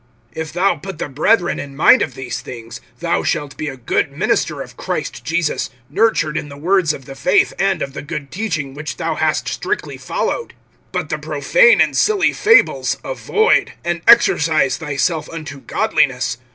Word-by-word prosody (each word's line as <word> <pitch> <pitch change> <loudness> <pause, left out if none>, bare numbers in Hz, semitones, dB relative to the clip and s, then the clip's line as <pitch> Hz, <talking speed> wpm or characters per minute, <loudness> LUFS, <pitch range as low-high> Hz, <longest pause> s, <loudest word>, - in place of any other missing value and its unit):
(6)If 160 -1 -5
thou 180 0 +2
put 190 +3 -8
the - - -3
brethren 175 - +1
in 140 -1 -7
mind 195 - +6
of - - -2
these 125 -3 -5
things, 115 -1 -9 0.2
thou - - +1
shalt 145 -1 -2
be 155 - -4
a 135 - -5
good 125 - -1
minister - - -1
of - - -15
Christ - - -4
Jesus, 160 0 -1 0.2
nurtured 165 -9 +1
in 145 - -4
the 140 - -10
words 175 +1 +2
of 135 -3 -8
the 135 - -9
faith 135 0 +2
and 195 -3 +1
of 135 - -6
the - - -6
good 145 -2 -6
teaching, 155 -9 -3
which 150 +2 -6
thou 165 -2 -1
hast 155 0 0
strictly 415 +3 -3
followed. 475 - -3 0.4
(7)But - - -3
the - - -2
profane - - +4
and - - +3
silly 415 -2 +3
fables[4:7] 455 +4 +3
avoid, 450 -2 +1
and 175 -1 -1
exercise 160 - +4
thyself 155 +1 -1
unto 155 -4 -7
godliness. - - 0
160 Hz, 175 wpm, -18 LUFS, 140-195 Hz, 0.4 s, mind